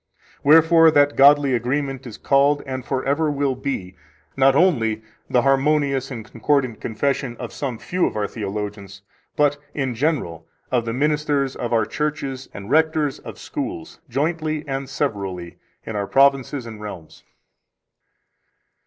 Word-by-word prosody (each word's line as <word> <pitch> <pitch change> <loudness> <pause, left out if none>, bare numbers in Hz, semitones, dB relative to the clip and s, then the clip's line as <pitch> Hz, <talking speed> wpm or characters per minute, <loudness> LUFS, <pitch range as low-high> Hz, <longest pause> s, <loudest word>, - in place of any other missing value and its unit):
Wherefore 165 +2 +6
that 145 -2 +3
godly 140 0 +6
agreement 135 +2 -2
is 110 - -9
called, 140 +1 +2
and 130 -2 -5
forever 140 +5 0
will 140 -2 0
be, 125 -9 -4 0.4
not 135 0 +4
only 115 - +2 0.3
the 125 - +3
harmonious 135 -1 +2
and 115 -5 -7
concordant 125 -1 -1
confession 125 +1 -2
of - - -7
some 130 -5 -4
few 180 +9 0
of - - -6
our 105 -1 -1
theologians, 100 -2 -6 0.3
but, 145 -1 +2 0.2
in 135 -3 -1
general, 115 - -2 0.2
of 120 -3 +1
the 115 - -2
ministers 145 0 0
of 120 - -4
our 115 -2 +2
churches 140 -1 -3
and 100 +3 -9
rectors 155 -2 +2
of - - -10
schools, 80 - -6
jointly 155 0 -2
and 135 -1 -4
severally, 95 - -3 0.3
in 110 - -5
our 100 -1 -2
provinces 135 0 +2
and 110 -2 -9
realms. 90 -7 -9
135 Hz, 140 wpm, -22 LUFS, 115-145 Hz, 0.4 s, Wherefore